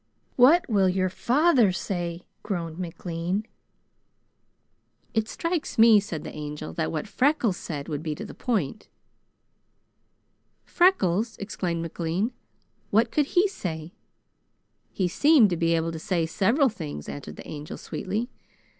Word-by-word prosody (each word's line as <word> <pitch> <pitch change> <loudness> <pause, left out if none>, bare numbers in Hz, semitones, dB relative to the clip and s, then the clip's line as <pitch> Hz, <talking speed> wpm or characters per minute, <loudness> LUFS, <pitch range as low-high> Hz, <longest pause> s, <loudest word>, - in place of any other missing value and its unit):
"What 290 +8 +6
will 195 -5 +3
your 185 0 +1
father 250 - +3
say?" 175 -2 -4 0.2
groaned 170 -4 -4
McLean. 175 +3 -3 1.7
"It 220 -1 0
strikes 335 -2 -3
me," 225 -1 +8
said 175 -7 -5
the - - -7
Angel, 150 - -6
"that 80 - -2
what 210 - -3
Freckles 250 -5 +1
said 145 -4 -6
would 150 -2 -3
be 155 -2 -3
to 215 - -7
the - - -9
point." 215 - -2 1.8
"Freckles!" 225 - +2
exclaimed 180 -4 -3
McLean. 170 +7 -2 0.6
"What 225 +3 +3
could 295 -2 +2
he 375 +4 +6
say?" 170 - -6 1.0
"He 185 - 0
seemed 260 - +5
to - - +1
be 165 0 +2
able 165 0 0
to 165 - -6
say 170 0 0
several 230 - +2
things," 75 - -7
answered 70 +2 -7
the - - -11
Angel 150 0 -7
sweetly. 210 +6 -3
185 Hz, 135 wpm, -26 LUFS, 165-230 Hz, 1.8 s, me